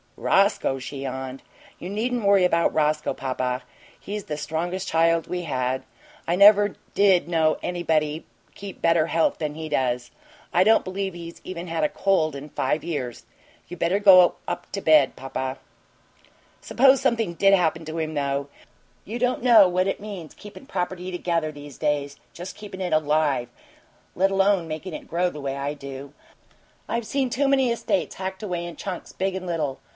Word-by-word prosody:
"Roscoe?" 195 -8 +2
she 135 +1 -7
yawned. 130 0 -5 0.4
"You 180 - -6
needn't 230 +2 -2
worry 200 -2 +5
about 170 -1 +2
Roscoe, 150 0 +1
papa. 130 -1 -3 0.4
He's 205 0 -6
the 150 - -4
strongest 170 +5 -3
child 165 0 +2
we 180 -1 -4
had. 130 -4 -2 0.4
I 170 - +2
never 205 +1 +6 0.2
did 190 -5 +4
know 160 -2 +2
anybody 160 -3 -1 0.3
keep 200 -1 -9
better 165 -1 +3
health 165 0 +1
than 150 -1 -3
he 160 0 -5
does. 125 -4 -1 0.4
I 180 - +5
don't 220 +3 +4
believe 190 0 -4
he's 170 0 -9
even 180 -1 -6
had 165 -1 -2
a 150 - +2
cold 165 -6 +1
in 140 +2 -8
five 150 +2 -1
years. 140 -8 -4 0.4
You 180 - -8
better 170 +4 +1
go 185 -3 +7
up - - -5
to 195 - -3
bed, 155 -5 +4
papa." 130 0 -4 1.0
"Suppose 270 +1 +4
something 230 -8 +1
DID 195 +3 +4
happen 165 -3 0
to 160 +1 -6
him, 155 -1 -2
though. 140 -1 -1 0.6
You 225 +4 -5
don't 250 0 0
know 225 -6 +7
what 185 +1 +1
it 195 - -2
means, 195 -6 -8
keepin' 210 +6 -12
property 180 -3 -3
together 170 -3 -1
these 145 -2 -12
days 145 -2 -1 0.2
just 180 +2 -8
keepin' 200 -3 -9
it 180 -3 -1
ALIVE, 150 -5 +1 0.7
let 195 +2 +2
alone 195 -3 +2
makin' 160 +3 -6
it - - -8
grow 175 +2 0
the 150 - -8
way 135 0 -3
I 140 +1 -2
do. 140 -1 -9 0.7
I've 235 -1 -2
seen 270 -3 -1
too 280 +4 +1
many 265 -3 +3
estates 260 +5 -1
hacked 190 +2 -5
away 175 -4 -3
in 170 -1 -7
chunks, 185 -3 -6
big 190 0 -1
and 185 -1 -5
little. 155 -6 -2
170 Hz, 175 wpm, -24 LUFS, 150-195 Hz, 1.0 s, go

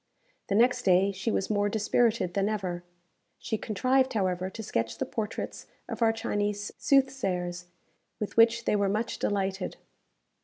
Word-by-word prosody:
The 200 - 0
next 245 +3 +4
day 190 +1 +4
she 195 +4 -3
was 205 -1 0
more 205 0 +2
dispirited 215 -2 +1
than 200 +2 +1
ever. 185 -5 -3 0.5
She - - -3
contrived, 260 +5 +1
however, 185 -3 0
to 220 +3 -8
sketch 115 - -2
the 265 - -1
portraits 220 -4 -5 0.2
of - - -6
our 225 -1 +5
Chinese 205 -2 -2
soothsayers, 190 -11 +1 0.5
with 210 - -4
which 230 +1 +5
they - - +2
were 200 -1 +2
much 215 +4 -2
delighted. 195 -2 -1
205 Hz, 150 wpm, -28 LUFS, 190-230 Hz, 0.5 s, our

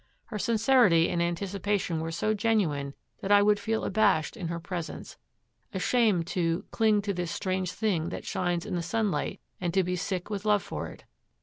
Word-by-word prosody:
Her 210 - -5
sincerity 225 -7 +4
and 170 - 0
anticipation 185 0 -1
were 165 0 -3
so 190 +6 0
genuine 185 -11 0 0.3
that 195 - -2
I 205 0 +7
would 205 0 +4
feel 220 +1 -1
abashed 195 -6 +2
in 175 - -4
her 170 0 -3
presence, 175 -1 -6 0.6
ashamed 215 -9 +2
to 170 0 -1
'cling 215 -2 +3
to 200 0 -1
this 175 -2 -3
strange 185 0 -2
thing 190 -7 0
that - - -6
shines 175 -1 -1
in - - -5
the 175 - 0
sunlight, 195 -3 -1 0.2
and 175 -2 -1
to 190 - +4
be 180 +1 -1
sick 180 0 -3
with 200 -1 -3
love 210 -1 +3
for - - -5
it.' - - -12
190 Hz, 185 wpm, -28 LUFS, 170-210 Hz, 0.6 s, I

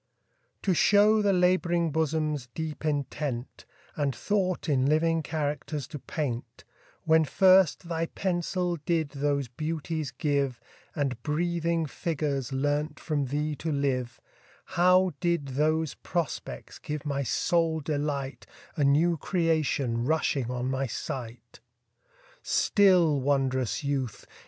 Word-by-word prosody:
TO 190 - +2
show 210 +4 +5
the 205 -1 +3
lab'ring 180 -2 +2
bosom's 155 -3 -1
deep 160 -2 -5
intent, 145 -3 -3 0.3
And 140 -4 -1
thought 185 - -1
in 135 -3 +2
living 165 +2 +2
characters 150 -1 -3
to 150 - -7
paint, 130 -5 -4 0.4
When 160 0 +4
first 185 +2 +4
thy 165 -1 -1
pencil 180 -1 -1
did 160 0 -1
those 140 -1 -1
beauties 155 +2 -3
give, 140 -2 -1 0.4
And 135 -6 -2
breathing 170 +2 0
figures 145 -4 -2
learnt 145 +3 -1
from 145 -3 -1
thee 150 +3 -1
to 160 - -3
live, 135 -4 -1 0.5
How 180 0 +4
did 170 -6 0
those 155 +2 +1
prospects 170 -4 -4
give 150 -1 -5
my 140 -1 -1
soul 160 +5 +1
delight, 145 -2 -3 0.3
A 150 - +1
new 160 +5 +3
creation 155 - 0
rushing 145 -5 +1
on 125 0 -2
my 135 0 -1
sight? 120 -2 -6 0.8
Still, 180 -8 +4
wond'rous 135 -1 0
youth! 135 -5 -2
150 Hz, 120 wpm, -28 LUFS, 140-165 Hz, 0.8 s, show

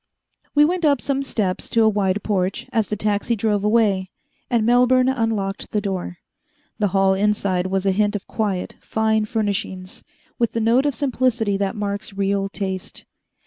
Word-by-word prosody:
We 295 0 +6
went 355 +2 -1
up 285 -4 +4
some 275 +1 -1
steps 210 -9 -2
to 230 - +3
a - - +5
wide 205 -2 +1
porch 190 -2 -1
as 220 -4 +1
the 210 - -1
taxi 210 +2 0
drove 210 -2 0
away, 210 -4 +2 0.4
and 235 -3 +2
Melbourne 250 +2 +4
unlocked 225 -6 -1
the 210 - 0
door. 190 -3 -4 0.6
The 210 - +2
hall 195 0 +3
inside 195 -2 0
was 190 0 -1
a 195 - +4
hint 205 +2 +1
of 205 - -4
quiet, 200 -5 -3
fine 220 -1 +1
furnishings, 205 -4 -3 0.4
with 235 -2 +1
the 230 - -1
note 235 +5 +3
of 285 - -1
simplicity 245 -5 0
that 195 +2 -1
marks 205 0 -4
real 195 0 0
taste. 190 -2 -5
210 Hz, 170 wpm, -21 LUFS, 195-230 Hz, 0.6 s, We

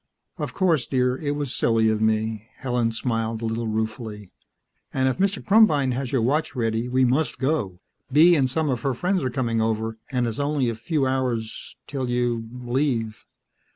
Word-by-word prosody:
"Of - - -4
course, 170 -9 +2
dear; 125 -1 +1
it 145 -1 -2
was 145 -3 -3
silly 115 -1 +2
of 110 0 0
me." 110 0 0
Helen 120 -4 0
smiled 115 0 -2
a - - 0
little 115 +1 -2
ruefully. 110 -2 -4 0.6
"And 130 0 +1
if 130 - -1
Mr. 195 +1 0
Krumbein 175 -11 +5
has 130 0 -3
your 130 -4 +1
watch 145 +5 0
ready, 115 0 -1
we 130 +1 +3
must 135 +6 +1
go. 130 - -1 0.3
Bee 165 +5 +7
and 135 -4 +2
some 155 +1 0
of 125 -3 -2
her 135 0 -1
friends 180 +3 0
are 130 - 0
coming 115 -3 -1
over, 110 0 -1
and 125 -2 +1
it's 115 +1 -3
only 140 -3 +1
a 115 - -3
few 135 +6 -1
hours 125 -4 -2
'till 130 -3 -3
you... 120 -2 -1
leave." 120 -2 -2
125 Hz, 185 wpm, -24 LUFS, 115-140 Hz, 0.6 s, Bee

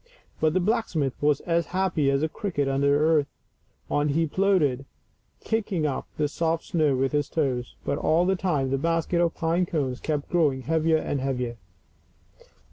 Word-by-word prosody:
But 155 +1 +2
the - - +4
blacksmith 175 - 0
was 145 -1 +2
as 170 -2 0
happy 170 -7 +1
as 140 +2 +1
a - - +2
cricket 160 -6 -2
under 140 +1 +2
the 145 - +4
hearth; 155 -3 +3 0.6
on 145 +1 0
he 165 +3 +2
plodded, 155 -7 +1 0.6
kicking 205 -7 -1
up 140 -3 -2
the 150 - +1
soft 165 +2 -1
snow 155 -5 +1
with 135 +1 0
his 145 -1 0
toes; 130 -6 -2
but 140 - -1
all 165 +3 +2
the 190 +1 +2
time 150 -8 -1
the 135 - +1
basket 165 +2 0
of 170 -1 +1
pine 170 +2 0
cones 135 -7 -2
kept 150 -2 -3
growing 150 -7 +2
heavier 160 +3 +2
and 145 -3 -2
heavier. 125 -3 -2
155 Hz, 175 wpm, -25 LUFS, 140-170 Hz, 0.6 s, the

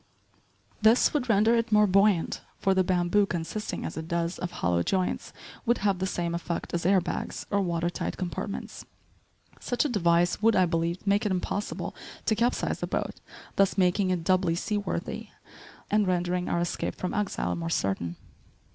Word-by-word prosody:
This 220 +3 +5
would 265 -5 -1
render 220 +2 +4
it 230 0 0
more 210 0 +6
buoyant, 195 -2 +3 0.2
for 195 - +2
the 190 0 +3
bamboo, 185 +3 +2
consisting 180 +5 -4
as - - -5
it 160 0 -5
does 170 0 -1
of 180 - -3
hollow 90 - 0
joints, 185 - -1 0.3
would 240 0 +2
have 195 -3 +2
the 190 - 0
same 170 -2 -2
effect 170 0 -4
as 170 0 0
air 195 0 +5
bags, 175 -1 -4
or 200 -1 +2
water 170 -2 0
tight - - -4
compartments. 185 +2 -5 0.8
Such 245 +4 0
a - - +1
device 175 -4 +2
would, 225 0 +4
I 185 - +5
believed, 170 +2 -1
make 200 +1 +3
it 210 - 0
impossible 190 +2 -3 0.3
to - - +3
capsize 235 +3 0
the - - -3
boat, - - -3 0.4
thus 195 0 +3
making 185 +1 +3
it 180 -2 0
doubly 185 -1 +2
seaworthy 205 +3 -3 0.6
and 210 -1 +3
rendering 180 0 0
our 170 - +1
escape 175 - -2
from 180 - -3
exile 210 -1 -1
more 165 0 -3
certain. 95 - -1
185 Hz, 175 wpm, -27 LUFS, 170-205 Hz, 0.8 s, more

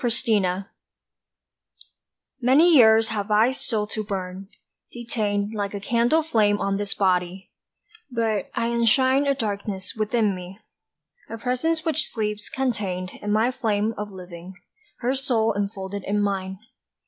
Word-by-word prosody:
DISSOLUTE 210 -6 +1 1.8
MANY 290 +8 +5
years 225 -4 +6
have 205 -1 -3
I 215 +4 +4
still 220 -5 -2
to 215 +1 -4
burn, 190 -1 -5 0.4
detained 215 -3 -2
Like 205 -1 -3
a - - -3
candle 235 +9 +2
flame 210 -9 +2
on 195 0 0
this 205 -1 -3
body; 185 -1 0 0.6
but 225 -5 -1
I 230 0 0
enshrine 260 +4 +3
A 280 - +2
darkness 200 -4 -3
within 215 -1 +1
me, 180 +1 -9 0.7
a 225 - -5
presence 285 +8 -1
which 315 -1 +2
sleeps 210 -1 -3
contained 200 -8 -2
In 205 - -2
my 220 +4 +3
flame 220 -2 0
of 210 0 -5
living, 180 -1 -10 0.5
her 250 +2 +1
soul 245 -5 +1
enfolded 200 -1 -4
in 205 +1 0
mine. 190 -2 -2
210 Hz, 135 wpm, -24 LUFS, 200-235 Hz, 1.8 s, years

